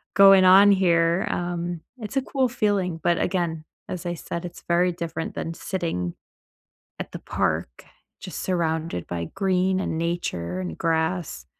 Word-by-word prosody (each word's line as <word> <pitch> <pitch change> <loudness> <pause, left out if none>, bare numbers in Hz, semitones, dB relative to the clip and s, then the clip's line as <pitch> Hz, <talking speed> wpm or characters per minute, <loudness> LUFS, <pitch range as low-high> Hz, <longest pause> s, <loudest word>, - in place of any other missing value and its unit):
going 195 -1 +8
on 195 +2 +8
here." 170 -2 +3
Um, 175 -1 -3 0.2
it's 220 0 -7
a - - +3
cool 265 0 0
feeling, 200 -8 0
but, 170 -1 +2
again, 170 -4 -1 0.2
as 180 0 -5
I 175 - -1
said, 170 +1 -5
it's 175 0 -9
very 175 +1 +2
different 165 -1 -4
than 165 - -3
sitting 165 - -3 0.8
at - - -6
the - - -5
park 60 - -2 0.4
just - - -6
surrounded 160 - -1
by 85 -1 -4
green 190 -1 +1
and 160 - -2
nature 95 - -2
and 85 -3 -5
grass. 160 - -1
175 Hz, 150 wpm, -24 LUFS, 160-185 Hz, 0.8 s, going